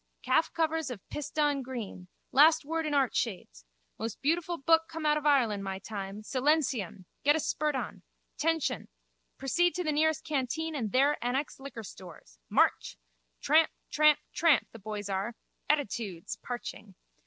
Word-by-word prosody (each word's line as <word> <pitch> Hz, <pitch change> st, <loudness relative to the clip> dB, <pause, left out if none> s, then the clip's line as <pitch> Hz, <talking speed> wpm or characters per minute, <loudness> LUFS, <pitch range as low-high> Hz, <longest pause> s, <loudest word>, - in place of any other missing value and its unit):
Calf -, -, +2 dB
covers 320 Hz, -2 st, 0 dB
of 235 Hz, -6 st, -8 dB
pissedon 295 Hz, -1 st, 0 dB
green. 235 Hz, -8 st, -6 dB, 0.2 s
Last 305 Hz, +3 st, +6 dB
word 325 Hz, +1 st, -1 dB
in 300 Hz, -, -2 dB
art 270 Hz, -3 st, +2 dB
shades. 120 Hz, -, -3 dB, 0.3 s
Most 225 Hz, 0 st, -4 dB
beautiful 340 Hz, +4 st, 0 dB
book 325 Hz, +3 st, +4 dB
come 325 Hz, -1 st, -5 dB
out 300 Hz, 0 st, +4 dB
of 300 Hz, 0 st, -1 dB
Ireland 230 Hz, -9 st, +3 dB
my 190 Hz, -1 st, -3 dB
time. 195 Hz, +1 st, -6 dB
Silentium! 255 Hz, -, 0 dB, 0.2 s
Get 290 Hz, +1 st, +5 dB
a -, -, +1 dB
spurt 300 Hz, -1 st, 0 dB
on. -, -, -4 dB, 0.3 s
Tention. 325 Hz, 0 st, 0 dB, 0.5 s
Proceed 340 Hz, +5 st, +1 dB
to 360 Hz, -, -1 dB
nearest 315 Hz, 0 st, +1 dB
canteen 310 Hz, +2 st, -2 dB
and 230 Hz, -8 st, -2 dB
there 275 Hz, +2 st, +3 dB
annex 265 Hz, +4 st, -1 dB
liquor 270 Hz, -4 st, -8 dB
stores. 165 Hz, -, -12 dB
March! -, -, +2 dB, 0.4 s
Tramp, 315 Hz, +2 st, +5 dB, 0.2 s
tramp, 300 Hz, -1 st, +5 dB, 0.2 s
tramp, 320 Hz, -5 st, +4 dB
the 230 Hz, -, -11 dB
boys 205 Hz, 0 st, -5 dB
are 200 Hz, +4 st, -2 dB, 0.3 s
(attitudes!) 225 Hz, -, -1 dB
parching. 215 Hz, -5 st, -7 dB
275 Hz, 150 wpm, -30 LUFS, 215-310 Hz, 0.5 s, Last